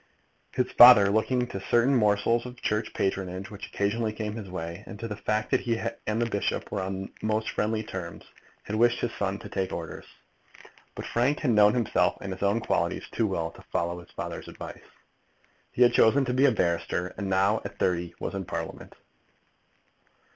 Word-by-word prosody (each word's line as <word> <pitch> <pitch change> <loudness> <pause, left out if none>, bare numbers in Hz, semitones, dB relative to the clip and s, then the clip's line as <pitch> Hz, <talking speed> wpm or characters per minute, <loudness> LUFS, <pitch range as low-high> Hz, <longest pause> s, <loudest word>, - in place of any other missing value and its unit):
His 125 - 0
father, 120 -5 +9
looking 125 +4 +1
to 100 -5 -6
certain 120 +6 +3
morsels 115 +2 +2
of 125 0 -11
Church 105 0 -1
patronage 95 0 -2
which 100 - -8
occasionally 110 +2 -1
came 105 -1 -4
in 110 - -6
his 100 -3 -8
way, 85 0 -5
and 105 - -9
to 115 - -4
the 105 - -5
fact 105 +1 -2
that - - +4
he 115 -2 -1 0.3
and 105 +1 0
the 120 - +2
bishop 105 -3 -2
were 100 - -2
on 95 +1 -4
most 110 0 -1
friendly 110 +1 -1
terms, 90 -5 -7 0.4
had 110 - -3
wished 120 +1 +3
his 120 - -1
son 100 -1 -2
to - - -10
take 95 -1 -2
orders. 85 -2 -6 0.9
But - - -6
Frank 130 +5 +1
had 140 -6 +2
known 105 0 +5
himself 120 -3 +1
and 100 -1 -5
his 95 - -11
own 100 +3 +2
qualities - - -1
too - - 0
well - - -2
to - - -15
follow 85 +1 -1
his 85 - -14
father's - - -6
advice. - - -9 0.9
He 125 - +4
had 120 0 +5
chosen 135 +5 +4
to 125 - -1
be 130 +2 +4
a 140 - +5
barrister, 90 -2 -1
and 100 -2 -4
now, 100 +3 +2
at - - -8
thirty, 90 -1 0
he 85 - -18
was - - -4
in 95 -1 -4
Parliament. 85 - -6
105 Hz, 195 wpm, -27 LUFS, 95-115 Hz, 0.9 s, father